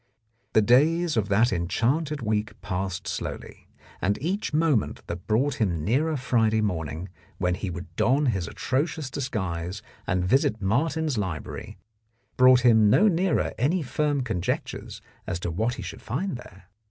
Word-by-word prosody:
The 110 - +5
days 155 +8 +4
of 105 -3 0
that 110 +3 +3
enchanted 130 - 0
week 110 0 -1
passed 95 -1 -3
slowly, - - -6 0.3
and 100 +3 +1
each 190 +8 -2
moment 150 -7 +1
that 85 +1 -7
brought 125 +5 +1
him 85 -7 0
nearer 150 +8 +1
Friday 115 -4 +2
morning, 80 -4 -2 0.3
when 90 -1 +1
he 95 +1 -3
would 85 -1 -8
don 135 +9 +2
his 100 -8 0
atrocious 140 +4 -2
disguise 95 -8 -3 0.2
and 90 0 +1
visit 110 0 +2
Martin's 145 +6 0
Library, 90 -7 -5 0.6
brought 130 0 +6
him 110 -4 +5
no 205 - +5
nearer 180 -2 +1
any 155 +8 +1
firm 145 +1 0
conjectures 110 -9 -3 0.2
as 85 - -2
to 85 - -2
what 110 +8 -1
he 110 - -7
should 90 -2 -7
find 150 - -3
there. 95 -5 -12
115 Hz, 150 wpm, -26 LUFS, 95-145 Hz, 0.6 s, brought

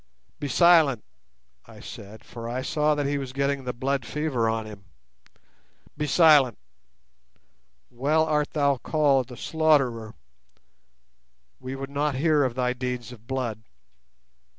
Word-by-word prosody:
"Be 145 - -3
silent," 155 -5 +4 0.6
I - - -14
said, 105 +2 -11
for 115 0 -8
I 125 +2 -3
saw 150 +1 +1
that 145 -1 -1
he 140 0 -1
was 130 -2 -6
getting 140 0 -1
the 125 - -2
blood 135 +2 -2
fever 135 -6 -1
on 110 -1 -2
him; 105 -3 -11 1.1
"be 150 0 -3
silent; 150 -7 +5 1.3
well 145 +6 +1
art 150 -2 0
thou 140 -2 +2
called 140 -1 +1
the 125 -1 -11
'Slaughterer'. 135 -9 +1 1.4
We 130 +1 -6
would 135 +1 -7
not 145 0 -1
hear 150 +1 +2
of 125 -3 -1
thy 125 -1 0
deeds 125 -2 -5
of 115 -2 -14
blood. 125 -5 -3
135 Hz, 135 wpm, -25 LUFS, 125-150 Hz, 1.4 s, silent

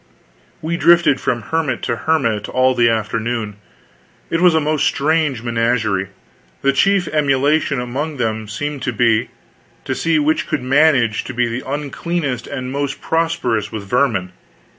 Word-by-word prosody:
We 170 +2 -1
drifted 170 -6 +4
from 120 -3 -1
hermit 155 -2 -2
to 120 - -1
hermit 115 -8 0
all 130 0 +2
the 120 -2 +3
afternoon. 110 -1 -2 0.7
It 165 - 0
was 180 -3 +5
a - - +4
most 155 -1 0
strange 150 -4 0
menagerie. 115 -4 0 0.6
The 140 0 +3
chief 195 +4 +2
emulation 145 -1 +1
among 140 +5 -4
them 110 -3 -2
seemed 145 +6 -4
to 130 -1 -2
be, 115 0 +2 0.6
to - - -1
see 165 -1 +1
which 155 +1 +1
could 155 -4 -2
manage 130 -4 +3
to 130 - -7
be 125 0 +1
the 120 +3 -5
uncleanest 145 -2 -3
and 130 -2 -5
most 140 0 -3
prosperous 160 -10 -1
with 110 -2 -5
vermin. 110 -4 0
130 Hz, 150 wpm, -18 LUFS, 115-155 Hz, 0.7 s, was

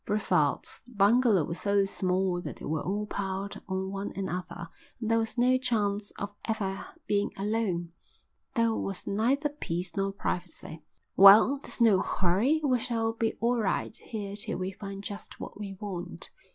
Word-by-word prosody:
Brevald's 180 -8 +1
bungalow 220 -3 +4
was 170 - -5
so 200 -1 +2
small 185 -1 0
that - - -6
they - - -9
were 155 0 -1
all 205 +3 -2
piled 195 -1 -4
on 190 0 -2
one 195 +1 -4
another, 180 -2 -4 0.3
and 225 -1 -2
there 230 - +4
was 225 +2 -3
no 255 +1 +4
chance 210 -5 0
of 200 0 -4
ever 195 -4 -2 0.2
being 205 0 +1
alone. 195 -5 -1 0.6
There 230 -2 +3
was 195 -3 -3
neither 255 +9 +1
peace 175 - -4
nor 195 0 0
privacy. 175 -4 -5 0.3
"Well, 210 +8 +8
there's - - -3
no 215 -5 +6
hurry. 210 - +2
We 255 -4 +3
shall 225 -1 -1
be 225 0 0
all 240 +1 +2
right 210 +2 -1
here 205 -3 -6
till 205 - -4
we 185 +1 -2
find 195 0 -7
just 205 0 -7
what - - -8
we 195 -2 -6
want." 185 -4 -5
200 Hz, 165 wpm, -29 LUFS, 190-225 Hz, 0.6 s, Well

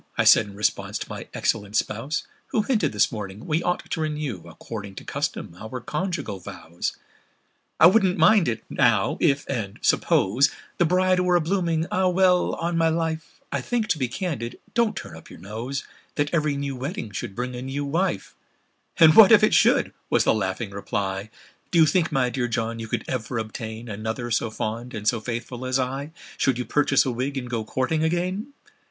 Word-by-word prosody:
I - - +3
said 105 - +6
in 100 - -11
response 105 +1 -1
to - - -7
my - - -7
excellent 105 -2 -1
spouse, 115 +9 -1 0.2
Who 215 - 0
hinted, 210 - +1
this 105 -1 +2
morning, 105 -2 -6
we 155 +2 0
ought 175 0 -1
to 160 - -3
renew 150 - -3
According 100 +3 -8
to - - -8
custom, 85 - -4
our 120 +3 -6
conjugal 150 - -3
vows. 85 -1 -5 0.8
"I - - +8
wouldn't 190 0 +5
much - - +6
mind 215 -5 +4
it, 115 -2 -2
now—if—and 125 -7 +1
suppose— 125 +10 +3 0.3
The 175 - +5
bride 185 +2 +3
were 180 -1 +3
a 175 - +4
blooming—Ah! 170 +1 0
well—on 180 -2 +2
my 165 0 +4
life, 160 +5 -3
I - - -1
think—to 220 - -1
be 130 - +1
candid—(don't 180 - -2
turn 125 - -7
up 80 - -13
your - - -11
nose!) 115 - -5 0.3
That 145 +2 -1
every 150 -3 +1
new 140 -1 -3
wedding 135 - -5
should 100 -1 -5
bring 125 +2 -3
a 125 - -5
new 135 +2 -3
wife!" 155 - -1 0.6
"And 160 -1 +8
what 220 -2 +9
if 215 -1 +7
it 215 - +4
should?" - - +4 0.2
was - - +3
the - - +3
laughing 100 0 -2
reply; 100 0 -3 0.4
"Do 175 - +1
you 160 - +8
think, 165 +2 +1
my 130 -4 +1
dear 125 -1 -1
John, 115 -1 -2
you 115 - -5
could - - -3
ever 125 -1 -3
obtain 110 +1 -5
Another 110 +3 -4
so 115 0 +1
fond 115 +3 -4
and 105 -1 -5
so 115 - +3
faithful 120 +2 -5
as 130 0 0
I, 135 +4 -3 0.3
Should 130 -3 +2
you 125 - -3
purchase 140 -2 +3
a 130 - 0
wig, 130 +4 -3
and 125 -2 -4
go 120 -2 -2
courting 130 +8 -1
again?" 185 - -1
135 Hz, 185 wpm, -24 LUFS, 110-165 Hz, 0.8 s, what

